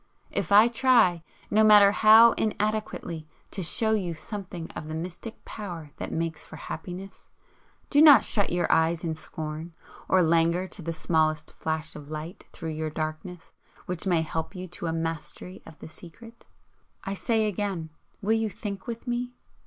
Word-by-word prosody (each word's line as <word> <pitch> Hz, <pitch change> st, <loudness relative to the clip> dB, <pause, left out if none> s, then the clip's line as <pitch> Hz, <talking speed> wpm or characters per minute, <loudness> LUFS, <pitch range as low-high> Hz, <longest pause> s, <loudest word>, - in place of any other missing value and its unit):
If -, -, -3 dB
I 210 Hz, +3 st, +8 dB
try, 235 Hz, -8 st, +3 dB, 0.3 s
no 215 Hz, +1 st, +4 dB
matter 210 Hz, -2 st, +7 dB
how 220 Hz, +2 st, +7 dB
inadequately, 215 Hz, -8 st, -2 dB, 0.2 s
to 195 Hz, -, -4 dB
show 220 Hz, +6 st, +3 dB
you 185 Hz, -6 st, -1 dB
something 180 Hz, -2 st, -7 dB
of 155 Hz, -, -8 dB
the 155 Hz, -, -5 dB
mystic 180 Hz, +7 st, -7 dB
power 170 Hz, -8 st, -7 dB
that -, -, -5 dB
makes 165 Hz, -2 st, -3 dB
for -, -, -12 dB
happiness, 190 Hz, +2 st, -8 dB, 0.6 s
do 290 Hz, -, +5 dB
not 300 Hz, -3 st, +9 dB
shut 205 Hz, -2 st, +1 dB
your 175 Hz, 0 st, +1 dB
eyes 160 Hz, +1 st, +2 dB
in 165 Hz, -2 st, -1 dB
scorn 155 Hz, +1 st, -7 dB, 0.4 s
or 185 Hz, -1 st, +4 dB
languor 170 Hz, +2 st, +2 dB
to 195 Hz, -, -8 dB
the 165 Hz, 0 st, -4 dB
smallest 155 Hz, -1 st, 0 dB
flash 160 Hz, 0 st, -3 dB
of 150 Hz, -1 st, -10 dB
light 155 Hz, +3 st, -7 dB
through 165 Hz, -1 st, -6 dB
your 155 Hz, 0 st, -3 dB
darkness 155 Hz, +3 st, -6 dB, 0.3 s
which 180 Hz, +1 st, -3 dB
may 170 Hz, -3 st, +2 dB
help 160 Hz, +4 st, -4 dB
you 185 Hz, 0 st, -6 dB
to 175 Hz, 0 st, -6 dB
a -, -, 0 dB
mastery 165 Hz, +2 st, -5 dB
of 155 Hz, -, -13 dB
the -, -, -10 dB
secret. 225 Hz, +9 st, -15 dB, 0.6 s
I 195 Hz, -, -3 dB
say 220 Hz, +2 st, 0 dB
again 195 Hz, -6 st, -3 dB, 0.3 s
Will 215 Hz, +3 st, +2 dB
you 225 Hz, -1 st, 0 dB
THINK 200 Hz, 0 st, -7 dB
with 230 Hz, 0 st, -6 dB
me? 245 Hz, 0 st, -3 dB
175 Hz, 170 wpm, -26 LUFS, 160-215 Hz, 0.6 s, not